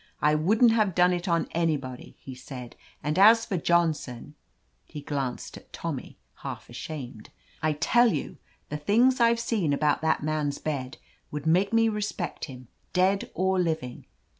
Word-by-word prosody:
"I 150 - +3
wouldn't 215 +10 +4
have 215 -5 +1
done 180 0 +4
it 175 +2 -3
on 170 -2 +1
anybody," 150 -7 -2
he 130 - -9
said; 125 -2 -9 0.3
"and 150 +4 0
as 225 +3 +7
for 200 - -3
Johnson 160 -7 0 0.2
— - - -44
" - - -41
he 150 - -8
glanced 140 -3 -4
at - - -17
Tommy, - - -6 0.2
half - - -8
ashamed 125 -8 -7 0.2
— - - -30
"I 155 0 +1
tell 235 +10 +3
you, 150 - -4 0.3
the 150 - -3
things 240 - +3
I've 235 0 +4
seen 210 -10 0
about 150 +1 +1
that 160 -2 +1
man's 150 -2 -1
bed 135 -4 -4 0.3
would 150 0 -6
make 180 +5 +3
me 225 0 +4
respect 210 -5 -3
him, 125 -4 -11 0.3
dead 190 +2 +2
or 190 0 +1
living. 160 -8 -2
160 Hz, 170 wpm, -27 LUFS, 145-200 Hz, 0.3 s, as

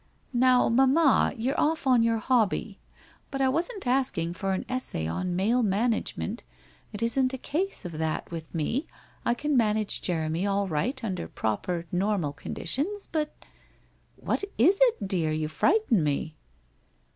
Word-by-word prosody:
' - - -37
Now, 250 -1 +5
mamma, 270 +5 +4
you're 250 +5 -1
off 315 -1 +1
on 255 -3 +5
your 230 0 +2
hobby, 220 -3 0 0.5
but 270 - -4
I 265 - +3
wasn't 350 - -2
asking 245 -10 0
for 195 +1 -2
an 190 - -3
essay 255 - -3
on 175 - -2
Male 220 +7 +2
Management, 220 +1 -1 0.5
it 215 +1 -4
isn't 255 +3 +1
a - - -6
case 335 - -2
of 165 -3 -6
that 160 +1 -2
with 165 0 -7
me, 225 - -1 0.4
I 235 - +3
can 295 +3 -1
manage 215 -3 +1
Jeremy 165 +1 -1
all 200 0 +1
right 190 - -1
under 190 -5 -3
proper 165 - -2
normal 180 -5 0
conditions, 320 - -3
but! 305 -2 -1 0.3
' - - -34
' - - -37
What - - -2
is 360 - +4
it, 460 - +3
dear? 175 -5 +1
You 155 0 -1
frighten 265 - +2
me.' 150 +1 -1
225 Hz, 160 wpm, -27 LUFS, 175-265 Hz, 0.5 s, Now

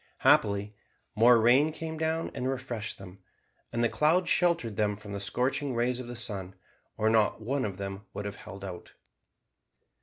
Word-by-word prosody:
Happily 100 +1 +3 0.4
more 115 +2 +6
rain 130 +7 +5
came 160 0 -6
down 160 +1 -1
and 130 - -2
refreshed 125 -5 -4
them, 95 0 -12 0.5
and 120 0 0
the - - +5
clouds 160 +8 +2
sheltered 170 - +2
them 105 -1 0
from 105 0 -9
the 100 - -3
scorching 130 +6 -1
rays 120 +1 0
of 125 - -7
the 120 - -6
sun, 100 -5 -3 0.4
or 110 - +1
not 110 -2 +3
one 130 +5 -1
of 100 -3 -4
them 100 0 -6
would 100 - -6
have 100 -1 -5
held 100 0 -9
out. 90 -2 -8
115 Hz, 175 wpm, -29 LUFS, 100-130 Hz, 0.5 s, more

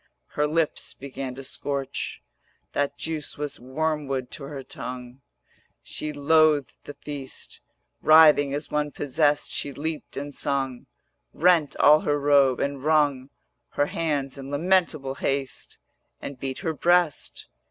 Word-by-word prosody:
Her 150 0 0
lips 160 0 -1
began 135 -1 -6
to 135 - -8
scorch, 140 0 -3 0.5
That 145 0 -1
juice 160 -2 -4
was 145 -1 -4
wormwood 135 -1 -2
to 140 - -5
her 140 -1 -7
tongue, 125 +1 -8 0.6
She 155 - -4
loathed 150 -1 +3
the 145 - -8
feast: 140 -2 -6 0.4
Writhing 155 -3 +7
as 145 +2 -3
one 150 0 0
possessed 145 +1 0
she 140 - -1
leaped 155 +3 -5
and 145 +1 -5
sung, 135 -3 -2 0.5
Rent 165 -3 +3
all 150 +1 +6
her 145 -1 0
robe, 140 -3 +4
and 140 -1 -2
wrung 145 -4 +2 0.4
Her 145 - +2
hands 145 -4 -2
in 135 0 -7
lamentable 155 -3 +1
haste, 135 -1 -2 0.4
And 140 -2 -7
beat 130 0 -4
her 160 - 0
breast. 175 -1 +1
145 Hz, 130 wpm, -25 LUFS, 135-155 Hz, 0.6 s, Writhing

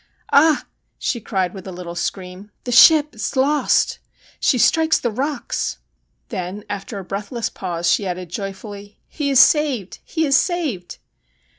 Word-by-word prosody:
Ah! 305 +1 +5 0.2
' - - -50
she 235 - -1
cried 190 -4 -2
with 195 -1 -9
a - - -6
little 175 -1 -7
scream, 185 +3 -5
' - - -50
the 245 - -4
ship 300 +3 +7
is 220 +4 -4
lost. 285 +3 +2 0.4
She 260 - +2
strikes 320 +6 +3
the 240 - -1
rocks.' 275 +4 -3 0.5
Then, 185 +3 -5
after 200 +1 -6
a 195 - -6
breathless 210 +5 -4
pause, 175 -2 -4
she 200 - +1
added 180 -1 -5
joyfully: 200 +1 -7
' - - -46
He 290 -3 -3
is 270 -2 +4
saved! 270 - +3
he 320 -1 -1
is 275 -2 +3
saved 290 - -1
210 Hz, 165 wpm, -20 LUFS, 190-280 Hz, 0.5 s, ship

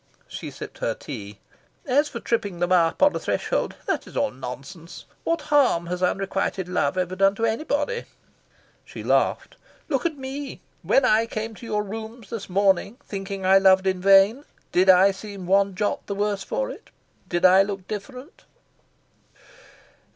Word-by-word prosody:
She - - -7
sipped - - -10
her - - -1
tea. 100 0 -8 0.5
"As 290 +3 +2
for 235 - -6
tripping 220 -6 -2
them 175 +1 -1
up 170 - +3
on 290 - +5
a - - -1
threshold - - -1
that - - -2
is - - -9
all 280 - +1
nonsense. 140 +7 -9 0.2
What 335 0 0
harm 255 -12 +4
has 180 +1 -4
unrequited 190 0 -1
love 180 -3 0
ever 185 0 -1
done 195 +1 +3
to 230 - 0
anybody?" 290 - -1 0.8
She - - -9
laughed. - - 0 0.3
"Look 270 -4 0
at 315 -3 -7
ME! 270 +1 -6 0.2
When 270 - +3
I 225 -1 +3
came 220 0 -4
to 230 +2 -11
your 210 -1 -1
rooms 220 +3 -8
this 225 -5 -6
morning, 200 +3 +2
thinking 195 -1 -5
I 190 +1 +6
loved 190 0 +5
in 185 -1 0
vain, 195 +7 +5 0.3
did 185 +2 +3
I 190 +2 +7
seem 195 -1 -9
one 195 +1 +2
jot 205 +1 -2
the 200 - -3
worse 205 -1 -1
for - - -2
it? - - -12 0.4
Did 175 0 +1
I 185 +1 +7
look 195 -1 -3
different?" 250 - -8
200 Hz, 165 wpm, -24 LUFS, 185-230 Hz, 0.8 s, I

